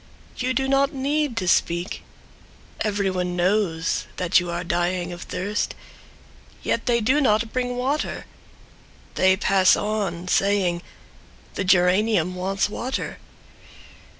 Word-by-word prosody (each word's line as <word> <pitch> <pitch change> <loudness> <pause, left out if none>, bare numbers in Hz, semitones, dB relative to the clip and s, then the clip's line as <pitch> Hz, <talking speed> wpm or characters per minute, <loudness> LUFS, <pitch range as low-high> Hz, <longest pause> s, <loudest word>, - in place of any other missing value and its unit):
You 255 0 -1
do 265 +2 +1
not 275 +2 +2
need 280 -1 -1
to 185 - -1
speak— 175 +1 +1 0.8
Everyone 190 -4 -1
knows 180 -2 0
that 180 0 +3
you 175 0 -4
are 170 +1 -3
dying 175 +1 -1
of 175 - -9
thirst, 205 +3 -3 0.9
Yet 230 - -1
they 235 -1 +3
do 260 +7 +3
not 220 -3 +2
bring 245 -1 -1
water! 275 +5 -2 0.9
They 190 0 +3
pass 190 -1 +4
on, 200 -5 -2
saying: 190 -3 +1 0.7
"The - - -2
geranium 185 0 +3
wants 190 +2 -1
water." 250 +5 -4
195 Hz, 120 wpm, -23 LUFS, 180-240 Hz, 0.9 s, pass